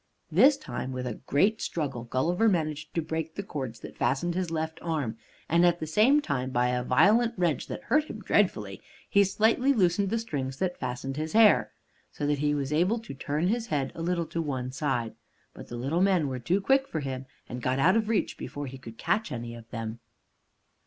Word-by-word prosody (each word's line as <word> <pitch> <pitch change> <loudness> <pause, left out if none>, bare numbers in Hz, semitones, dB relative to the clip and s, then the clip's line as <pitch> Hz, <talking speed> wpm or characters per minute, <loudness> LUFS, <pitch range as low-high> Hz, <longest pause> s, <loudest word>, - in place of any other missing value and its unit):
This 260 - +6
time, 130 - -5
with 125 0 -4
a 120 -4 -5
great 200 +10 +2
struggle 135 -7 -3
Gulliver 175 - +2
managed 155 -4 -1
to 165 - 0
break 160 0 -4
the 200 - -4
cords 130 - -5
that - - -9
fastened 140 +8 +1
his 180 -1 -1
left 160 0 -3
arm, 150 -9 -2 0.3
and 170 +1 +3
at 175 -1 +4
the - - -3
same 220 - +4
time, 130 - -1
by 125 -1 +1
a 125 0 0
violent 220 - +4
wrench 170 -6 0
that - - -6
hurt 305 +2 +2
him 220 - -8
dreadfully, 110 - 0 0.3
he 200 - +5
slightly 225 +7 +3
loosened 195 -3 +2
the 225 - 0
strings 135 -12 -3
that 180 +1 -2
fastened 130 +2 -4
his 155 +1 -3
hair, 220 -1 +5 0.4
so 145 - -4
that 145 -1 +1
he 150 0 +1
was 140 0 -2
able 180 +9 +2
to 230 -9 -8
turn 145 +4 -2
his 230 +3 0
head 140 -3 -1
a - - -7
little 170 0 0
to 165 - -3
one 130 -5 -3
side. 120 -5 -1 0.4
But - - -11
the 120 - -6
little 140 +8 0
men 185 -6 +3
were 130 -1 -3
too 175 +11 +1
quick 270 +5 +3
for 155 - -3
him, 130 -1 -5 0.2
and 125 +1 -6
got 130 +2 0
out 180 +8 +4
of 220 -1 +1
reach 225 -3 0
before 145 0 -5
he 135 0 -8
could 115 -3 -11
catch 220 - 0
any 120 -1 -5
of 115 -1 -12
them. 115 -1 -5
155 Hz, 215 wpm, -28 LUFS, 130-195 Hz, 0.4 s, This